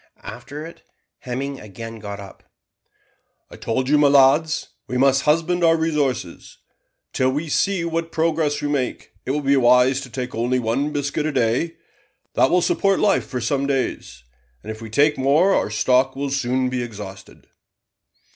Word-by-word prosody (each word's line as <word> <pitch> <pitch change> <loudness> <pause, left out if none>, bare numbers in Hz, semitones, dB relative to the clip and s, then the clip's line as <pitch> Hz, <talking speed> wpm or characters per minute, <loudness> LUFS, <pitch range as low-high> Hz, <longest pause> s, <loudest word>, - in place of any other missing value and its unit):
After 145 +5 -8
it, 165 - -12 0.4
Hemming 135 +2 -5
again 115 +2 -9
got 100 -1 -7
up, 100 -1 -12 1.1
"I - - -10
told 130 +3 -2
you, 150 +2 +4
my 145 - +5
lads, 140 +3 +3 0.2
we 125 - -2
must 135 +1 +3
husband 165 +3 +1
our 165 0 +5
resources. 145 - -2 0.6
Till 130 - +2
we 150 +4 -3
see 190 +2 +1
what 165 0 -3
progress 155 -2 0
we - - 0
make, 140 -4 -3 0.2
it - - -3
will 145 +2 -1
be 140 0 +3
wise 125 +1 +4
to 130 - -9
take 125 +1 -5
only 120 +3 0
one 125 +5 -1
biscuit 145 +1 -2
a - - -1
day. 125 +7 0 0.6
That 130 - +3
will 180 -1 +3
support 195 +2 +1
life 200 -2 +2
for 125 - -4
some 140 +4 0
days, 130 - -3 0.4
and - - -6
if 110 +1 -9
we 110 - -8
take 145 +6 +2
more 150 +9 +3
our - - +1
stock 125 +5 +2
will 140 0 -3
soon 130 -1 0
be 125 -1 -2
exhausted." 100 -5 -9
135 Hz, 170 wpm, -21 LUFS, 125-150 Hz, 1.1 s, my